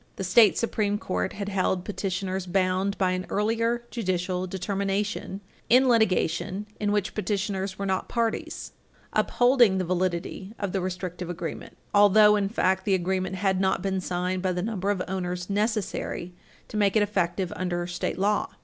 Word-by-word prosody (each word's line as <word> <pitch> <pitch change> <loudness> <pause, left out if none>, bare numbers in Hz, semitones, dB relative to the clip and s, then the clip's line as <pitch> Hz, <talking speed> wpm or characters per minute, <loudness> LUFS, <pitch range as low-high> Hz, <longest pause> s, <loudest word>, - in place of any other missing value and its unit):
The - - -4
state 200 +3 +5
Supreme 210 -3 0
Court 90 - -2
had 200 -1 -5
held 190 -2 0
petitioners 190 -2 -3
bound 185 +1 +1
by 185 -2 +2
an 185 0 -3
earlier 230 +3 0
judicial 185 -4 -1
determination, 195 +1 -2 0.3
in 255 +3 +6
litigation 200 -3 +1
in 205 -1 0
which 205 -1 0
petitioners 195 -1 -2
were 200 - -3
not 190 -1 -1
parties, 230 -1 -2 0.4
upholding 245 -5 +4
the 185 - 0
validity 185 +3 -2
of 200 -3 -3
the 195 - -1
restrictive 180 -1 -4
agreement, 170 -2 -6 0.2
although, 210 +1 +7
in 200 -1 0
fact, 190 -3 +1
the 195 -1 +2
agreement 185 +1 -1
had 190 0 +1
not 190 -1 +1
been 190 -1 -1
signed 180 +1 -2
by 185 -1 0
the 180 0 -2
number 200 -3 -2
of 195 -3 0
owners 180 0 -3
necessary 205 -4 -2 0.3
to 215 - -5
make 200 -1 +2
it 215 - +5
effective 185 -3 -1
under 175 -1 -2
state 175 -1 -3
law. 210 +8 +1
190 Hz, 160 wpm, -26 LUFS, 185-205 Hz, 0.4 s, although